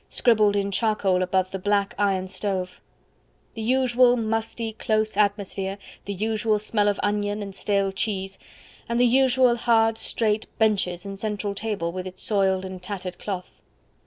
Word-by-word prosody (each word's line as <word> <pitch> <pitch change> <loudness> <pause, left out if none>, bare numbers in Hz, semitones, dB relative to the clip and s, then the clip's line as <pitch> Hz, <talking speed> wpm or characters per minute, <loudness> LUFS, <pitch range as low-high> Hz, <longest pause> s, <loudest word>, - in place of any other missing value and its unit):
scribbled 215 -4 +3
in 200 0 0
charcoal 200 -3 +1
above 185 0 0
the 195 - -4
black 200 +1 +1
iron 190 -2 +1
stove; 185 -1 -3 0.7
the 225 - -6
usual 250 +1 +3
musty, 225 0 -2
close 215 0 0
atmosphere, 200 -1 0 0.3
the 200 - -3
usual 215 +2 0
smell 210 0 0
of 205 -1 +1
onion 205 +1 0
and 200 -1 -7
stale 200 0 0
cheese, 195 -1 -3 0.5
the 235 +1 +3
usual 255 0 +4
hard 225 -1 +2
straight 215 -1 0
benches 195 -5 +1
and 195 -1 -7
central 210 -1 -2
table 200 -5 -3
with 185 +1 -5
its 185 0 -9
soiled 190 -2 +1
and 185 -1 -7
tattered 185 -1 -6
cloth. 185 -3 -5
205 Hz, 150 wpm, -24 LUFS, 190-220 Hz, 0.7 s, usual